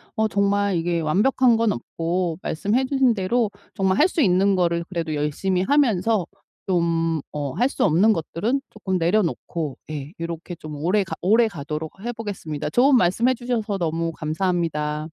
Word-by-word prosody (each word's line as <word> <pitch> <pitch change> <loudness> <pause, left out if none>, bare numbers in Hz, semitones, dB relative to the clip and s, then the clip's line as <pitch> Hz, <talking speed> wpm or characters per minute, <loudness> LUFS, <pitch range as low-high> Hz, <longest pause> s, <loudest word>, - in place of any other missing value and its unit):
어 220 -1 +2
정말 200 -1 +1
이게 170 0 0
완벽한 235 - +3
건 225 -1 +2
없고 170 +6 -2
말씀해 210 +11 0
주신 265 -2 +3
대로 215 +2 0 0.2
정말 190 0 +1
할 325 - +6
수 335 - -1
있는 195 +1 +3
거를 170 -2 +1
그래도 165 -4 -3
열심히 150 +6 -1
하면서 225 - +2 0.4
좀 165 -3 +1
어 145 -3 -3
할 245 +3 +2
수 - - -1
없는 185 +8 +4
것들은 205 - -1
쪼끔 190 -3 -2
내려놓고 170 -4 -1
예 150 +1 -6
요렇게 170 +1 -5
좀 155 -2 -8
오래 195 +4 +2
가 - - -7
오래 225 +5 +4
가도록 155 -1 -6
해 240 - -3
보겠습니다. 190 -10 -5
좋은 265 +2 +5
말씀해 235 +6 +2
주셔서 230 -4 -2
너무 165 -1 -1
감사합니다. 155 -2 -1
185 Hz, 335 characters per minute, -23 LUFS, 165-220 Hz, 0.4 s, 할